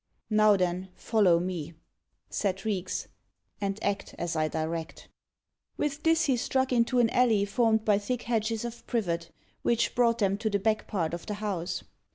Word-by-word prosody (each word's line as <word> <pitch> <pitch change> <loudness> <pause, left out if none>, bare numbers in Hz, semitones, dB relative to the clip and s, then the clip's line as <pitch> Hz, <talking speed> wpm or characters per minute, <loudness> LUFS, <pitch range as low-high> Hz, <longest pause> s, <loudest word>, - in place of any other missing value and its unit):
"Now 215 -1 +5
then, 180 +1 -1
follow 195 -7 +3
me," 170 -3 -4 0.5
said 195 0 -2
Reeks, 190 -4 -2 0.5
"and 195 0 -1
act 200 -1 -2
as 170 -1 -2
I 155 -1 +2
direct." 160 +1 -4 0.7
With 295 0 -1
this 325 0 +3
he 265 -4 +2
struck 260 +2 0
into 240 +1 +2
an 235 -2 +4
alley 225 -5 +3
formed 220 +1 +2
by 205 -2 +4
thick 245 +4 -3
hedges 225 -1 -1
of 235 0 -8
privet, 170 -7 -1 0.3
which 235 0 +1
brought 235 -2 +3
them 200 -2 +1
to 220 - 0
the 200 - +1
back 215 +2 0
part 170 -6 -1
of 170 - -6
the 210 - -2
house. 200 -4 -3
210 Hz, 170 wpm, -28 LUFS, 180-235 Hz, 0.7 s, Now